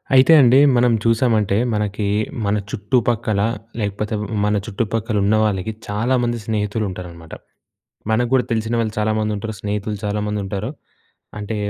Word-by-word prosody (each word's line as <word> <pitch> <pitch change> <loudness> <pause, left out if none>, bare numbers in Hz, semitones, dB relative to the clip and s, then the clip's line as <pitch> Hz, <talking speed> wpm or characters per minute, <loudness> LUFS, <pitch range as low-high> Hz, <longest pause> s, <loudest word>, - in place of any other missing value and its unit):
అయితే 130 +5 +7
అండి 130 +1 +6 0.2
మనం 120 0 +4
చూశామంటే 115 -3 +2 0.2
మనకి 105 -1 -1 0.4
మన 100 +1 +1 0.2
చుట్టుపక్కల 110 -1 0 0.4
లేకపోతే 105 +1 -2
వ్ - - -3 0.2
మన 105 0 +1
చుట్టుపక్కల 110 0 -2
ఉన్నవాళ్ళకి 110 -1 +1 0.2
చాలామంది 120 +3 0
స్నేహితులుంటారన్నమాట. 95 -6 -4 0.8
మనకు 120 +2 +2
గూడా 130 -2 +4
తెలిసినవాళ్ళు 115 0 -1
చాలామంది 110 0 0
ఉంటారు. 110 +2 -5
స్నేహితులు 105 0 -3
చాలామంది 105 0 -2
ఉంటారు. 100 +4 -4 0.7
అంటే 105 +1 -4
105 Hz, 120 wpm, -20 LUFS, 105-115 Hz, 0.8 s, అయితే